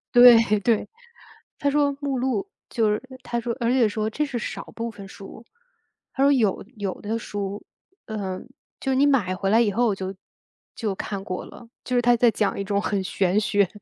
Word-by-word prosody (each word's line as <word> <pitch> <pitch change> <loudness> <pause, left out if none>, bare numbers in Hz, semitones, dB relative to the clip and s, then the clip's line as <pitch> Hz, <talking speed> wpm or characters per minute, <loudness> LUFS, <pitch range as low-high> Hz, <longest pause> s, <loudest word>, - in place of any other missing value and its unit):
对 245 0 +10 0.3
对， 225 +1 +1 0.7
他 285 - 0
说 285 0 +3
目 280 -2 -1
录 265 +10 -1 0.2
就 225 -3 +2
是 210 0 0 0.2
他 235 - -2
说 235 0 -2
而 235 -2 0
且 250 -4 +4
说 215 +1 -2
这 295 +8 -1
是 270 -4 -3
少 - - -5
部 230 0 -3
分 205 -3 -10
书， 195 +3 -11 0.7
他 265 - -1
说 280 - +6
有 220 -9 +1
有 200 -3 -4
的 220 +2 -2
书， 205 -2 -5 0.4
呃， 195 -4 -4 0.4
就 265 -1 -1
你 270 +2 +4
买 240 -10 +2
回 195 +1 -1
来 225 +3 +5
以 215 -4 +2
后 230 +1 +2
就 190 0 -4 0.6
就 210 -4 -2
看 195 0 -5
过 185 -2 -4
了， 240 - -13
就 250 - -2
是 - - +5
他 240 0 +4
在 235 0 +5
讲 210 -2 0
一 - - 0
种 200 0 0
很 200 -1 -1
玄 190 +1 +1
学， 200 -2 +2
220 Hz, 210 characters per minute, -24 LUFS, 200-245 Hz, 0.7 s, 对